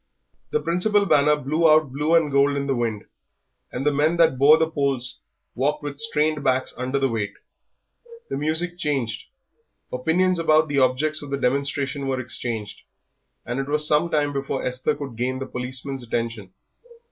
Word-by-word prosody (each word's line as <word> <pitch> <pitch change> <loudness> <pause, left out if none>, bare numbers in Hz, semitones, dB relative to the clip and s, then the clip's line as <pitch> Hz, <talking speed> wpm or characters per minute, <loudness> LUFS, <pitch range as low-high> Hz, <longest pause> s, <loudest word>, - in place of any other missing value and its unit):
The 455 - 0
principal 200 - +2
banner 150 -4 +4
blew 155 +4 +1
out 155 -3 +4
blue 150 +5 +1
and 160 -3 +3
gold 140 +1 +3
in 140 - -2
the 140 - 0
wind, 115 -4 -2 0.7
and 130 +3 -4
the 150 - +3
men 155 +4 +2
that 160 -6 +3
bore 150 +3 +7
the 160 0 +1
poles 140 -5 -2 0.3
walked 145 +4 -1
with 145 -1 -5
strained 155 -9 0
backs 130 -1 +1
under 130 +2 -2
the 135 -1 +2
weight; 105 -4 -3 0.9
the - - -4
music 160 +5 -2
changed, 135 -9 -2 0.7
opinions 170 +8 +1
about 155 -1 +3
the 140 -1 +1
objects 140 +4 +1
of 145 - -8
the 140 - -1
demonstration 140 +1 -1
were 130 -1 -1
exchanged, 115 -4 -4 0.6
and 120 +2 -3
it 135 - -3
was 150 +1 +2
some 150 +3 +2
time 145 -3 0
before 135 -1 -3
Esther 125 0 0
could 135 -6 -7
gain 130 +2 -1
the 135 - -4
policeman's 130 +2 -5
attention. 115 -4 -4
140 Hz, 170 wpm, -23 LUFS, 130-155 Hz, 0.9 s, bore